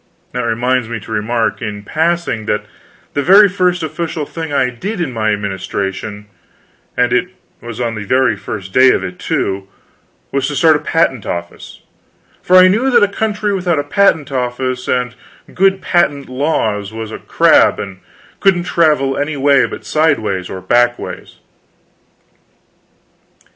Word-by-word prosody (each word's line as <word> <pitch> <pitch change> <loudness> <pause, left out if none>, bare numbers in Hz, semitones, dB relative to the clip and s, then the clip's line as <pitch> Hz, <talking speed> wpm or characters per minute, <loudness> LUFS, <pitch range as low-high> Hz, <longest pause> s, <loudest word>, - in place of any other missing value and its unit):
That 125 - -2
reminds 120 +1 0
me 120 -1 -4
to 105 - -12
remark, 110 +2 -1
in 105 -3 -5
passing, 160 -6 -1
that 105 - -1 0.5
the 145 - 0
very 200 +7 +7
first 180 -2 0
official 160 0 -3
thing 160 +1 -6
I 130 -3 +1
did, 195 - -5
in 155 -7 -2
my 110 -1 0
administration 100 0 -4 0.7
and 125 -1 +2
it 125 +8 +2 0.3
was 120 -1 -8
on 120 -2 -1
the 110 -2 -5
very 125 +1 +2
first 95 -1 -7
day 130 0 +6
of - - -1
it, 90 -1 -7
too 95 0 -2 0.6
was 140 -1 0
to 145 - -4
start 160 +1 +5
a - - 0
patent 140 -10 0
office; 85 0 -6 0.6
for 185 - +2
I 185 0 +9
knew 225 +8 +2
that 240 -4 +5
a - - +5
country 210 0 -2
without 180 -4 0
a 145 - 0
patent 160 -3 +2
office 125 0 -2
and 125 -2 0 0.4
good 195 +1 +2
patent 145 -6 +1
laws 110 -7 -1
was 110 0 -6
just - - -8
a - - -29
crab, - - +4
and 95 -2 -7 0.4
couldn't 190 -3 +3
travel 150 -6 +2
any 145 +1 -2
way 140 0 +4
but - - -9
sideways 110 - 0
or 95 - -6
backways. 120 +4 0
130 Hz, 160 wpm, -16 LUFS, 110-165 Hz, 0.7 s, I